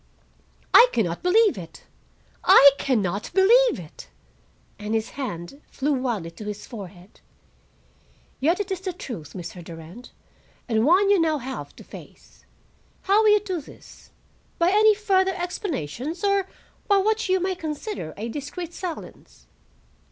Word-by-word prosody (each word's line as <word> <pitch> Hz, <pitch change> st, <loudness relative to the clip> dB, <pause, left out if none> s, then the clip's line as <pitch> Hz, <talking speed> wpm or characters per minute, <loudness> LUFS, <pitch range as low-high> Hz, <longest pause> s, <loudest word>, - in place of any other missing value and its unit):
"I 485 Hz, -, +9 dB
can 225 Hz, -, +2 dB
not 170 Hz, 0 st, -4 dB
believe 410 Hz, -, +3 dB
it. 165 Hz, -2 st, -11 dB, 0.6 s
I 280 Hz, +1 st, +8 dB
can 250 Hz, -6 st, +1 dB
not 190 Hz, +3 st, -3 dB
believe 470 Hz, +6 st, +5 dB
it." -, -, -12 dB, 0.7 s
And 210 Hz, +1 st, -3 dB
his 220 Hz, 0 st, -2 dB
hand 255 Hz, -, -6 dB
flew 290 Hz, +2 st, -1 dB
wildly 235 Hz, -10 st, -2 dB
to 190 Hz, +6 st, -10 dB
his 210 Hz, 0 st, -6 dB
forehead. 195 Hz, -4 st, -11 dB, 1.2 s
"Yet 330 Hz, +8 st, +1 dB
it 405 Hz, -1 st, -3 dB
is 375 Hz, -1 st, -3 dB
the 375 Hz, -1 st, -4 dB
truth, 205 Hz, -, -8 dB
Mr. 175 Hz, 0 st, -8 dB
Durand, 165 Hz, +8 st, -11 dB, 0.6 s
and 225 Hz, +1 st, +1 dB
one 390 Hz, +5 st, +4 dB
you 395 Hz, -4 st, +4 dB
have 310 Hz, -3 st, +1 dB
now 265 Hz, -, -5 dB
to -, -, -16 dB
face. -, -, -15 dB, 0.6 s
How 405 Hz, +3 st, +4 dB
will 435 Hz, -, +4 dB
you 420 Hz, -1 st, +5 dB
do 375 Hz, -5 st, -4 dB
this? -, -, -16 dB, 0.5 s
By 340 Hz, +2 st, +3 dB
any 425 Hz, +1 st, +5 dB
further 385 Hz, -3 st, +1 dB
explanations, 335 Hz, -, -4 dB
or 395 Hz, -1 st, +2 dB, 0.4 s
by 405 Hz, -, +4 dB
what 435 Hz, +1 st, 0 dB
you 375 Hz, 0 st, +3 dB
may 375 Hz, +1 st, -1 dB
consider 315 Hz, -, -6 dB
a 220 Hz, +3 st, -4 dB
discreet 295 Hz, +7 st, -6 dB
silence?" 355 Hz, -3 st, -8 dB
310 Hz, 150 wpm, -24 LUFS, -, 1.2 s, I